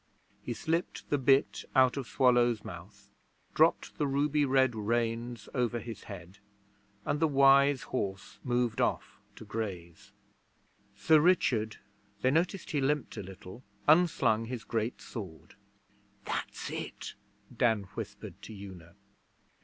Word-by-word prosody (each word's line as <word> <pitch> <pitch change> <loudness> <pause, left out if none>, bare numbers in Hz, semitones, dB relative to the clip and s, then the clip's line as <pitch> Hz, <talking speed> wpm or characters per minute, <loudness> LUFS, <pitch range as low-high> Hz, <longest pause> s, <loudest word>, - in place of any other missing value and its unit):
He 120 - -4
slipped 165 +9 -2
the 145 - +2
bit 135 +1 +3
out 130 -2 +5
of 135 -4 -4
Swallow's 120 -3 +3
mouth, 100 +3 -11 0.4
dropped - - +2
the 145 - +2
ruby 145 +2 +2
red 130 -2 +3
reins 115 +1 -2
over 120 -2 0
his 115 -1 -8
head, 95 -1 -10 0.7
and 145 - 0
the 160 - +3
wise 140 -1 +5
horse 95 -6 -4
moved 120 -2 0
off - - -1 0.2
to - - -11
graze. 95 -6 -6 0.8
Sir 160 -1 +5
Richard 130 -10 +2 0.5
(they 130 - +4
noticed 175 +4 0
he 145 - 0
limped 145 0 0
a - - -4
little) 95 +4 -11 0.2
unslung 145 -9 +4
his 120 -1 -5
great 115 +1 -2
sword. 95 -9 -9 0.7
'That's - - -4
it,' - - -6 0.4
Dan 115 -4 +2
whispered - - -8
to 110 - -9
Una. 95 -3 -11
120 Hz, 130 wpm, -30 LUFS, 105-140 Hz, 0.8 s, out